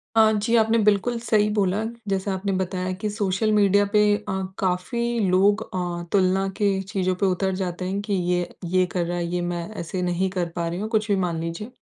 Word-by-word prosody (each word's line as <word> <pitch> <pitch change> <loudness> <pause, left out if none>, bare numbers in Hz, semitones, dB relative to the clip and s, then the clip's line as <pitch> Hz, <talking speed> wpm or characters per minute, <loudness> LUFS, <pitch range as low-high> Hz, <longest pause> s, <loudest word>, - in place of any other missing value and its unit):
अ, 220 -1 +6
जी। 220 +2 +1
आपने 225 0 +4
बिल्कुल 215 +3 +2
सही 210 -2 +2
बोला। 205 0 +1 0.3
जैसा 195 0 -1
आपने 195 +1 -2
बताया 185 0 -2
कि 210 - -1
सोशल 205 +1 0
मीडिया 205 -1 +4
पे 210 - +5
अ, 210 -1 -5 0.3
काफ़ी 230 +6 -1
लोग 200 +3 +3
अ, 175 -1 -3
तुलना 190 0 +2
के 205 - +2
चीज़ों 190 -2 -1
पे - - +4
उतर 190 +1 +1
जाते 180 0 -3
हैं। 195 +2 -2
कि 205 -1 -3
ये 180 -1 0 0.3
ये 185 0 +4
कर 175 -2 -1
रहा 175 +1 -3
है। 170 - -1
ये 175 0 -2
मैं 175 0 -3 0.2
ऐसे 180 +2 -4
नहीं 180 +1 0
कर 180 -2 -2
पा 170 -1 -1
रही 175 +2 -3
हूँ। 215 +1 -3
कुछ 220 -1 +1
भी - - +4
मान 165 -2 -2
लीजिए। 170 +8 -5
190 Hz, 215 wpm, -24 LUFS, 180-210 Hz, 0.3 s, अ